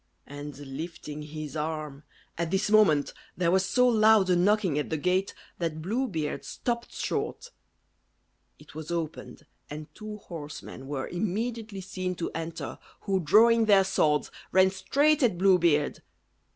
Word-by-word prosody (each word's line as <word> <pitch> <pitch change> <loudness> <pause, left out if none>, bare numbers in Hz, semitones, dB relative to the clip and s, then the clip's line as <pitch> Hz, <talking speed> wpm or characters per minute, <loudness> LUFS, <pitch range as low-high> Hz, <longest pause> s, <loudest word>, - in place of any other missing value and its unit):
And 145 0 -8
lifting 150 +2 -7
his 150 0 -7
arm 150 -2 -4 0.3
At 170 -1 -2
this 190 +3 0
moment 175 -10 +4 0.2
there 170 -1 +2
was 190 +1 +3
so 250 +7 +3
loud 215 -4 +5
a - - +5
knocking 185 -4 +2
at 150 - -3
the 160 - -1
gate, 185 +5 0 0.2
that 165 -2 -2
Blue 225 +11 -1
Beard 160 -8 -3
stopped 235 -1 -3
short. 485 - -3 1.1
It - - -16
was 155 0 -7
opened, 160 -2 -5 0.2
and 150 +1 -8
two 215 -1 -8
horsemen 150 -7 -9
were 140 -2 -3
immediately 215 +2 -3
seen 185 -1 -4
to 170 - -4
enter, 165 0 -5 0.2
who, 195 -2 0
drawing 225 +7 +5
their 200 -2 +6
swords, 155 -6 +1 0.2
ran 190 +1 +5
straight 290 - +2
at 225 -9 +2
Blue 190 0 +5
Beard. 150 -4 +2
180 Hz, 150 wpm, -28 LUFS, 155-210 Hz, 1.1 s, their